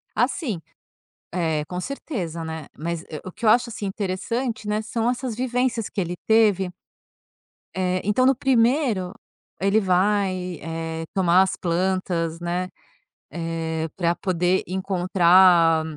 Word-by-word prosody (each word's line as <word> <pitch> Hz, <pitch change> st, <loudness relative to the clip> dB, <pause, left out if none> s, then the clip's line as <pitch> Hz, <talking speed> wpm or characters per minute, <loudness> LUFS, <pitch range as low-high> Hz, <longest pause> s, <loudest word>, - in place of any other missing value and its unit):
Assim, 235 Hz, -, 0 dB, 0.7 s
eh, 160 Hz, -4 st, 0 dB
com 180 Hz, +2 st, -4 dB
certeza, 180 Hz, -, -5 dB
né, 160 Hz, -2 st, -6 dB
mas, 170 Hz, +2 st, -4 dB
eh, 155 Hz, -, -6 dB
o 185 Hz, -, -6 dB
que -, -, -9 dB
eu -, -, +7 dB
acho 240 Hz, +2 st, +4 dB
assim 210 Hz, -2 st, -5 dB
interessante, 215 Hz, +4 st, -3 dB
né, 210 Hz, +1 st, 0 dB
são 230 Hz, +1 st, -1 dB
essas 250 Hz, -1 st, -3 dB
vivências 250 Hz, -2 st, 0 dB
que -, -, -3 dB
ele 175 Hz, -1 st, -3 dB
teve... 210 Hz, -4 st, +4 dB, 1.0 s
eh, 185 Hz, 0 st, 0 dB
então 210 Hz, +6 st, +2 dB
no 270 Hz, -, +5 dB
primeiro, 240 Hz, -6 st, +2 dB, 0.5 s
ele 200 Hz, +3 st, +3 dB
vai, 185 Hz, -2 st, +1 dB
eh, 165 Hz, 0 st, -4 dB
tomar 185 Hz, -1 st, +5 dB
as 190 Hz, -, -1 dB
plantas, 175 Hz, -2 st, -1 dB
né, 175 Hz, +1 st, -2 dB, 0.6 s
eh, 165 Hz, -1 st, -3 dB
para 170 Hz, -2 st, +1 dB
poder 180 Hz, 0 st, +1 dB
encontrar. 180 Hz, -3 st, +4 dB
185 Hz, 130 wpm, -23 LUFS, 170-215 Hz, 1.0 s, eu